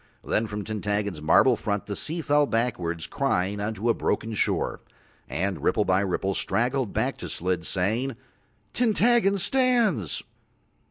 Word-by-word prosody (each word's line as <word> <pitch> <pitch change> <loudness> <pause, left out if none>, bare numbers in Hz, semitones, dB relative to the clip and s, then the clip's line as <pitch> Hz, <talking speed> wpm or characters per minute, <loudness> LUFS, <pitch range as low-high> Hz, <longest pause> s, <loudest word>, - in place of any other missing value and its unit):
Then 110 +1 0
from 105 0 -5
Tintaggon's 105 -4 -2
marble 120 - +5
front 105 -2 -2
the 100 - -4
sea 165 - -3
fell 145 -1 +3
backwards 90 -9 -1
crying 100 -7 -1
on 105 +2 -2
to 105 +4 -3
a 115 - +5
broken 115 0 -1
shore, 105 - 0 0.5
and 85 +7 -2
ripple 105 - +2
by 95 0 +3
ripple 95 0 -1
straggled 125 +2 0
back - - -1
to - - -7
Slid 90 -1 -2
saying: 110 +8 -1 0.6
"Tintaggon 230 -3 +3
stands." 235 - +1
110 Hz, 145 wpm, -26 LUFS, 95-140 Hz, 0.6 s, marble